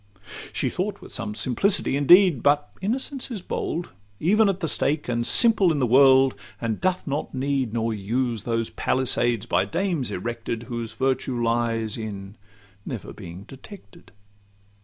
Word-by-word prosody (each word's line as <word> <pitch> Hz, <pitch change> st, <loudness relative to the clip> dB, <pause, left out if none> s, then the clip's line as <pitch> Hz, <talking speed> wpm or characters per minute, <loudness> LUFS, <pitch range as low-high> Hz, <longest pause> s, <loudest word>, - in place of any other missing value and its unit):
She -, -, -2 dB
thought -, -, -3 dB
with -, -, -13 dB
some 105 Hz, -, -4 dB
simplicity 185 Hz, -, 0 dB
indeed; 170 Hz, -, +6 dB
But 145 Hz, +1 st, +2 dB
innocence 260 Hz, +6 st, -2 dB
is 215 Hz, -7 st, -6 dB
bold 170 Hz, -, -4 dB, 0.3 s
even 210 Hz, +5 st, +3 dB
at 190 Hz, -1 st, -2 dB
the 165 Hz, -, -2 dB
stake, 150 Hz, 0 st, 0 dB
And 120 Hz, -1 st, 0 dB
simple 220 Hz, -7 st, +5 dB
in 155 Hz, -, 0 dB
the 130 Hz, -, +2 dB
world, 130 Hz, +1 st, +5 dB, 0.3 s
and 115 Hz, -2 st, -3 dB
doth 185 Hz, 0 st, 0 dB
not 140 Hz, -1 st, -3 dB
need 135 Hz, -2 st, -1 dB
Nor 115 Hz, 0 st, -1 dB
use 115 Hz, +3 st, -2 dB
those 115 Hz, +1 st, -2 dB
palisades 120 Hz, -3 st, +1 dB
by -, -, +1 dB
dames 175 Hz, -, -1 dB
erected, 115 Hz, +3 st, -4 dB
Whose 120 Hz, -1 st, -5 dB
virtue 130 Hz, -2 st, -1 dB
lies 115 Hz, -1 st, 0 dB
in 100 Hz, -2 st, -7 dB, 0.5 s
never 115 Hz, -2 st, -7 dB
being 90 Hz, -1 st, -10 dB
detected. 135 Hz, -, -14 dB
130 Hz, 150 wpm, -24 LUFS, 115-165 Hz, 0.5 s, indeed